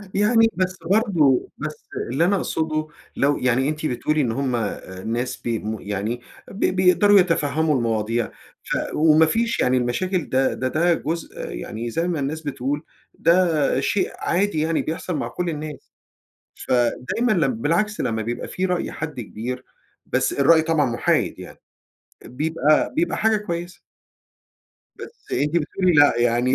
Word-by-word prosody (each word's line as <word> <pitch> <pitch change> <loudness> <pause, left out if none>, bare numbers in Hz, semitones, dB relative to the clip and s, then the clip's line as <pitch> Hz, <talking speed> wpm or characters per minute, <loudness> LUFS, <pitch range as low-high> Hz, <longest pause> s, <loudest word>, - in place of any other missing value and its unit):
يعني 225 +3 +4
بس 185 0 -1
برضه 175 - +3
بس 155 0 -6 0.3
اللي 155 +6 +2
أنا 200 +3 +3
اقصده 155 -4 -1 0.3
لو 145 +1 +2
يعني 130 +3 +1
أنتِ 155 +1 -4
بتقولي 150 +3 0
إن 125 -5 0
هم 130 +1 -1
الناس 115 +3 -3
بي 115 -2 -2
مو 110 0 -4
يعني 105 +4 -3 0.3
ب 195 - -10
بيقدروا 185 +2 +5
يتفهّموا 160 -3 +1
المواضيع. 115 -1 0 0.4
ف - - -2 0.2
وما 155 +1 +5
فيش 230 +8 0
يعني 130 +1 +3
المشاكل 170 +9 -1
ده 130 0 +2
ده 130 - -2
ده 170 +6 +2
جزء 165 +1 -4
يعني 110 - -5
زي 165 +9 -1
ما 170 -4 -1
الناس 145 +3 -3
بتقول، 145 0 -3 0.3
ده 165 -6 +2
شيء 190 +8 0
عادي 185 -2 0
يعني 160 +1 +1
بيحصل 165 +2 -4
مع - - -2
كل 180 -1 -3
الناس. 155 -1 -7 0.8
فدايمًا 125 - +1
لم 150 - +1
بالعكس 210 +8 0
لما 110 -3 -1
بيبقى 120 +2 -4
في 185 - -3
رأي 180 -1 -2
حد 155 -5 -5
كبير، 125 +4 -6 0.4
بس - - 0
الرأي 160 +3 +5
طبعًا 160 -2 +2
مُحايد 120 -1 0
يعني، - - -11 0.7
بيبقى 155 +2 +1
بيبقى 335 +2 0
حاجة 220 0 +3
كويسة. 175 -3 -5 1.2
بس 470 - -12
أنتِ 150 +3 0
بتقولي 180 +3 +1
لأ 145 -2 +6
يعني 120 +2 +2
155 Hz, 150 wpm, -22 LUFS, 125-175 Hz, 1.2 s, لأ